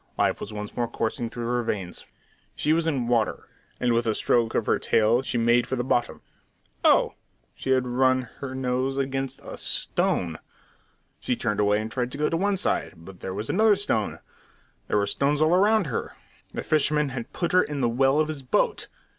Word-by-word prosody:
Life - - +1
was 100 - -6
once 105 -1 -6
more 120 -1 0
coursing 115 +1 -2
through 120 0 -5
her 120 +1 0
veins. 95 -6 -4 0.5
She 155 - +2
was 165 0 +1
in 135 -7 0
water, 115 -3 0 0.3
and 120 -1 +2
with 115 0 +1
a 110 - +1
stroke 115 -2 +1
of - - +1
her - - +2
tail 115 +3 +3
she 125 - -2
made 120 +1 +3
for 130 - -1
the 120 - -1
bottom. 120 -1 -1 0.6
Oh! - - +4 0.4
She - - -7
had 130 -1 +3
run 130 +1 +2 0.2
her 130 -2 -5
nose 130 +1 -1
against 135 0 -2
a - - -8
"stone!" 85 -3 -1 0.8
She 125 - -1
turned 105 -3 -2
away 105 0 +3
and 110 +1 -5
tried 125 0 -2
to - - -5
go 150 - +1
to 165 - 0
one 200 +2 +1
side, 185 - -1
but 90 +2 -13
there 95 - -5
was 105 +3 -4
another 215 +1 +4
stone; 190 - -1 0.7
there - - +1
were 100 - +2
stones 140 +8 +1
all 155 +3 +4
round 210 +1 +4
her. 130 -7 -4 0.4
The - - -4
fisherman 150 -1 +2
had 125 -3 -6
put 170 - -2
her 185 - +5
into 145 -4 -3
the 120 - +2
well 135 +4 +3
of 155 - +2
his 155 -3 -5
boat. 125 - 0
125 Hz, 205 wpm, -25 LUFS, 115-145 Hz, 0.8 s, her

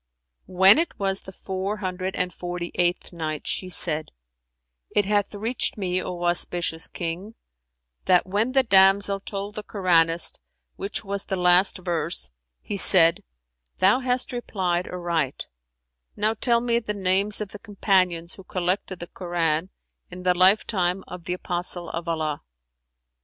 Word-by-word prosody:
When 190 - +6
it 335 - -2
was 195 -1 -1
the 190 - -11
Four 190 +2 -4
Hundred 185 -1 -4
and 180 -1 -1
Forty 175 0 -5
eighth 175 0 -1
Night, 155 -3 -4
She 185 - -2
said, 160 -3 +1 0.8
It 205 - +1
hath 205 0 0
reached 225 +4 -2
me, 185 -2 -1
O 175 -1 -5
auspicious 175 -1 +1
King, 180 +6 -6 0.7
that 180 -1 +4
when 210 +7 -1
the 265 -1 +4
damsel 195 -2 +4
told 200 +1 -6
the 215 - -6
Koranist 170 -5 +1 0.4
which 200 +2 -4
was 200 0 -3
the 190 - -2
last 180 +2 +3
verse 170 - 0 0.3
he 205 - -4
said, 170 -3 +7 0.6
"Thou 200 +7 +4
hast 250 -1 0
replied 185 -7 -2
aright; 170 -6 -2 0.7
now 215 +1 0
tell 235 +1 +1
me 235 -1 +1
the 210 -3 -5
names 195 +2 +1
of 210 -2 -4
the 210 - -11
Companions 185 -5 0
who 195 - -12
collected 185 +1 -2
the 175 - -8
Koran, 170 -1 -2 0.4
in 180 0 -10
the 180 0 +3
lifetime 185 0 +2
of 180 -2 -9
the 180 - -2
Apostle 175 -1 0
of 170 +1 -5
Allah." 155 -3 -2
185 Hz, 145 wpm, -24 LUFS, 175-200 Hz, 0.8 s, said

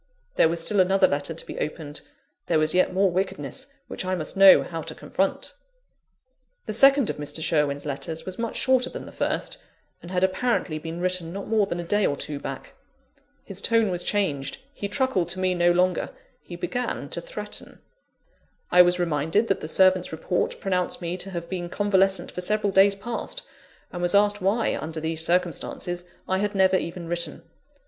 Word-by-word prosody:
There 160 - +5
was 165 0 -1
still 205 +4 +1
another 190 +1 +5
letter 145 +3 -2
to - - -2
be - - -7
opened: 150 -1 -5 0.5
there 165 - +2
was 155 0 +3
yet 185 0 +3
more 190 0 +2
wickedness 190 +3 -3 0.2
which - - -5
I 185 0 -1
must 155 -4 -4
know 195 -1 +8
how 165 -2 -5
to - - -6
confront. 195 - -2 1.1
The 215 - -3
second 275 +2 +5
of - - -9
Mr. 150 +2 -4
Sherwin's 150 -3 +1
letters 150 +3 -4
was 185 +2 -6
much 230 -1 -2
shorter 260 -1 +2
than - - -7
the - - -10
first, - - -2 0.4
and 170 - -10
had 180 0 0
apparently 190 -4 0
been 165 +2 -6
written 180 -2 -1
not 195 +2 -6
more 215 -3 +2
than 175 -2 -3
a - - -3
day 205 +5 +1
or 140 - +1
two 145 0 -4
back. 135 -1 -7 0.7
His 195 -1 -4
tone 225 -3 +2
was 175 -1 -2
changed; 160 -9 -1 0.2
he 205 - -4
truckled 200 - 0
to 185 +2 -1
me 185 -1 +1
no 175 0 +3
longer 180 0 +1 0.3
he 175 - -9
began 245 +8 -3
to - - -3
threaten. - - -7 0.9
I 180 - +8
was 175 0 +4
reminded 165 +5 0
that 195 - +1
the - - -5
servant's 185 +2 +3
report 160 +2 -2
pronounced 180 -2 -1
me 170 +1 -2
to 190 +1 -5
have 170 -2 -5
been 175 -2 -4
convalescent 195 -1 +1
for 180 - -5
several 210 +2 +1
days 195 +1 +5
past: 235 - -3 0.5
and 175 - -5
was 175 +2 +2
asked 205 0 +3
why, 205 +5 +1
under 160 +1 -5
these 160 0 -2
circumstances, 175 +1 -1 0.2
I 190 0 +1
had 205 0 -1
never 190 -1 +4
even 170 -1 -5
written. 170 -2 -2
180 Hz, 190 wpm, -25 LUFS, 165-200 Hz, 1.1 s, know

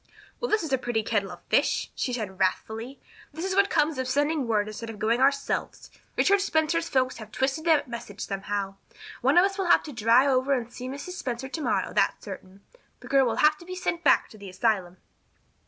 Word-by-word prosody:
"Well, 485 - -2
this 430 -4 +2
is 305 -4 -3
a 265 - +2
pretty 240 -3 -1
kettle 205 -3 0
of 175 - -11
fish," - - +1
she 255 - -2
said 210 -6 -4
wrathfully. 220 +7 -2 0.3
"This 320 +4 -5
is 380 - -1
what 400 +1 +3
comes 300 -2 +1
of 260 - -1
sending 290 0 0
word 210 -2 +1
instead 215 +2 -7
of 225 - -7
going 230 +4 +1
ourselves. 280 +1 0 0.3
Richard 400 0 +4
Spencer's 330 -2 0
folks 255 -1 +1
have 215 -1 -10
twisted 270 +6 -1
that 315 -4 +3
message 235 -4 -8
somehow. 195 0 -3 0.4
One - - +3
of 355 - +7
us 395 0 -3
will 370 -2 0
have - - +5
to 300 - -8
drive 235 +5 +4
over 260 +2 +2
and 240 -2 -2
see 255 - -7
Mrs. 285 +6 -6
Spencer 265 -7 -4
tomorrow, 290 +3 -1
that's - - +1
certain. 190 +1 -9 0.4
This - - -12
girl 270 -2 +5
will 230 - 0
have 305 0 +4
to 345 - -13
be 365 +1 -6
sent 345 -2 -2
back 290 - +4
to 215 - -15
the 200 -1 -9
asylum." 185 -2 0
255 Hz, 215 wpm, -26 LUFS, 220-310 Hz, 0.4 s, of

